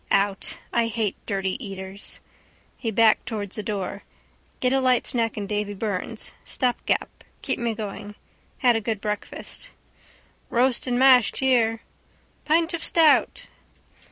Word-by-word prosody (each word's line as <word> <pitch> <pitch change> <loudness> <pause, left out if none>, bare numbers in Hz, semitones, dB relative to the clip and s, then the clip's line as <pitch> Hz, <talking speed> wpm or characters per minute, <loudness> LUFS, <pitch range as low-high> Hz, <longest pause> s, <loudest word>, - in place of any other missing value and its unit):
Out. 195 0 +2 0.2
I 235 -1 +2
hate 220 -3 -1
dirty 195 +5 -2
eaters. 195 -1 -6 0.6
He 230 - -3
backed 220 0 +4
towards 205 -4 -4
the 215 - -3
door. 200 -1 -4 0.6
Get 255 0 +2
a 270 - +3
light 255 -2 +3
snack 230 -3 0
in 205 - -2
Davy 205 0 -2
Byrne's. 200 -2 -4
Stopgap. 250 -2 -1 0.2
Keep - - -1
me 235 -2 -1
going. 205 0 -6 0.5
Had 245 -2 +6
a 225 - 0
good 220 -1 -2
breakfast. 210 - -5 0.8
—Roast 250 +1 +2
and 245 -1 +1
mashed 255 -3 +6
here. 230 -4 +2 0.6
—Pint 330 +3 +2
of 335 - -3
stout. 320 -3 +4
225 Hz, 135 wpm, -24 LUFS, 205-250 Hz, 0.8 s, Had